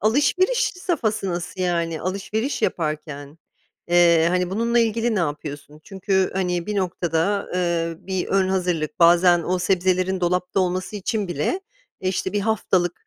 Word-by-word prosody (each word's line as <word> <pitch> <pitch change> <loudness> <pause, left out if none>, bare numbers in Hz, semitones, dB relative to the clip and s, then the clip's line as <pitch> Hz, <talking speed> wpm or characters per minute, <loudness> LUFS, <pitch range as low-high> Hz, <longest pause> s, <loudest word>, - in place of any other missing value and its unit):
alışveriş 295 - +2 0.2
safhası 220 - -1
nasıl 180 +2 -5
yani? 170 -3 -1
Alışveriş 210 +7 -2
yaparken, 150 -2 -3 0.5
ııı, 170 -2 +5
hani, 180 0 0
bununla 230 +4 +1
ilgili 230 0 +1
ne 210 - +1
yapıyorsun? 150 -1 -5
Çünkü, 190 -1 0
hani, 180 -2 -1
bir 210 - -2
noktada, 180 +1 0
ııı, 170 -2 -1
bir 190 -2 -2
ön 195 -1 +2
hazırlık, 175 -5 -1
bazen 175 0 +5
o 180 +2 -1
sebzelerin 185 0 +1
dolapta 180 +1 0
olması 185 +3 -2
için 205 0 -2
bile, 175 - -1 0.4
işte, 185 0 -2
1 205 - 0
haftalık 190 -5 0
180 Hz, 140 wpm, -22 LUFS, 170-200 Hz, 0.5 s, ııı